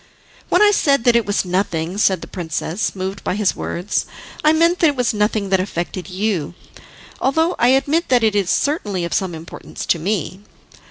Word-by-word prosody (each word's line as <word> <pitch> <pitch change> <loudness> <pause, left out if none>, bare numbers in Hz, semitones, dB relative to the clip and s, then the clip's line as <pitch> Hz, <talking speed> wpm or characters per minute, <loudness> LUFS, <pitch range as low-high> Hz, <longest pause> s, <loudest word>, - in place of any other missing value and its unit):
"When - - +4
I 415 - +6
said 280 - +2
that 240 -1 +4
it 235 -3 +2
was 205 -1 0
nothing," 180 -1 -1
said 190 -4 +2
the - - -8
princess, 170 +3 -3
moved 190 +1 -5
by - - -1
his 205 -2 +1
words, 180 +4 -2 0.4
"I 305 - +5
meant 335 +3 +3
that 330 - +5
it 290 - +1
was 250 -3 0
nothing 210 -1 0
that 190 -1 +3
affected 185 0 -4
you, 185 -4 -2 0.6
although 320 +6 +1
I 240 - +4
admit 280 +6 +2
that 245 -2 +3
it 220 -1 +3
is 200 -3 +1
certainly 210 - 0
of 170 - -4
some 185 -3 -1
importance 160 +1 -8
to 170 - +1
me. 185 +1 -2
205 Hz, 195 wpm, -19 LUFS, 185-260 Hz, 0.6 s, I